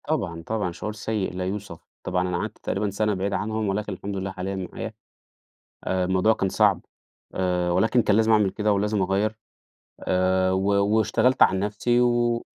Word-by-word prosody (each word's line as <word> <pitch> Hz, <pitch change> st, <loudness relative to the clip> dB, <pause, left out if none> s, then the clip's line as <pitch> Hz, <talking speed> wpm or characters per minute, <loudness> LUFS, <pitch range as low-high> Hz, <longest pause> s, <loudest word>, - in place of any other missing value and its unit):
طبعًا، 95 Hz, -, -2 dB
طبعًا، 110 Hz, -5 st, -1 dB
شعور 105 Hz, +5 st, -5 dB
سيء 110 Hz, -3 st, -3 dB
لا 90 Hz, 0 st, -3 dB
يوصف. 95 Hz, -3 st, -5 dB, 0.2 s
طبعًا 90 Hz, 0 st, 0 dB
أنا 90 Hz, -, -1 dB
قعدت -, -, -4 dB
تقريبًا 105 Hz, +1 st, -2 dB
سَنة 105 Hz, +2 st, 0 dB
بعيد 100 Hz, +1 st, -2 dB
عنهم، 110 Hz, 0 st, -1 dB
ولكن 105 Hz, +1 st, -2 dB
الحمد 100 Hz, +2 st, -6 dB
لله 95 Hz, 0 st, -3 dB
حاليًا 95 Hz, +1 st, -4 dB, 0.2 s
معايا. -, -, -6 dB, 0.9 s
آآ 95 Hz, -1 st, 0 dB
الموضوع 95 Hz, +4 st, +3 dB
كان 95 Hz, -3 st, -1 dB
صعب، 100 Hz, -3 st, +3 dB, 0.5 s
آآ 90 Hz, -1 st, 0 dB
ولكن 110 Hz, +7 st, +3 dB
كان 100 Hz, -, +2 dB
لازم 110 Hz, +1 st, +3 dB
أعمل 105 Hz, -3 st, +4 dB
كده 105 Hz, +1 st, 0 dB
ولازم 105 Hz, +1 st, 0 dB
أغيّر، 100 Hz, +4 st, 0 dB, 0.6 s
آآ 95 Hz, 0 st, +1 dB
و 95 Hz, +1 st, 0 dB, 0.3 s
واشتغلت 125 Hz, +4 st, +2 dB
على 95 Hz, -, +3 dB
نفسي 105 Hz, +4 st, +1 dB
و 120 Hz, -1 st, +2 dB
100 Hz, 170 wpm, -24 LUFS, 95-110 Hz, 0.9 s, أعمل